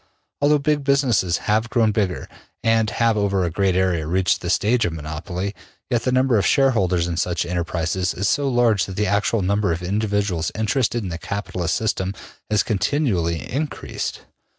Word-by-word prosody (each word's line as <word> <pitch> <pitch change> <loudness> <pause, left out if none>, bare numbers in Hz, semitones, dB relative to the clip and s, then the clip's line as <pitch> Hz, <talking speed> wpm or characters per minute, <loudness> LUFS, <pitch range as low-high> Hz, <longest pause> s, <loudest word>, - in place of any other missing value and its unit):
Although 150 +1 +4
big 145 0 0
businesses 130 -11 +2
have 110 +2 +1
grown 115 -3 +2
bigger 100 -5 -1 0.4
and 115 -1 +3
have 115 0 +1
over 100 -2 +1
a 85 - -1
great 95 +2 +1
area 90 -4 +1
reached 95 +4 +1
the 90 - -4
stage 115 +6 +2
of 85 - -1
monopoly, 85 +5 -5 0.4
yet 120 -2 +2
the 130 - +2
number 130 -3 +3
of - - 0
shareholders 95 -11 +2
in 85 -1 -3
such 85 0 0
enterprises 85 +1 -1
is 100 +2 -1
so 140 +7 +1
large 120 -6 +2
that 95 - -7
the 105 - 0
actual 100 +2 +1
number 100 0 +1
of 85 +2 -3
individuals 100 -3 -1
interested 115 +1 0
in 95 - -4
the 85 -1 -5
capitalist 90 -2 -3
system 100 -3 -1 0.3
has 105 -2 +2
continually 100 - 0
increased. 145 +3 -4
100 Hz, 175 wpm, -22 LUFS, 90-115 Hz, 0.4 s, Although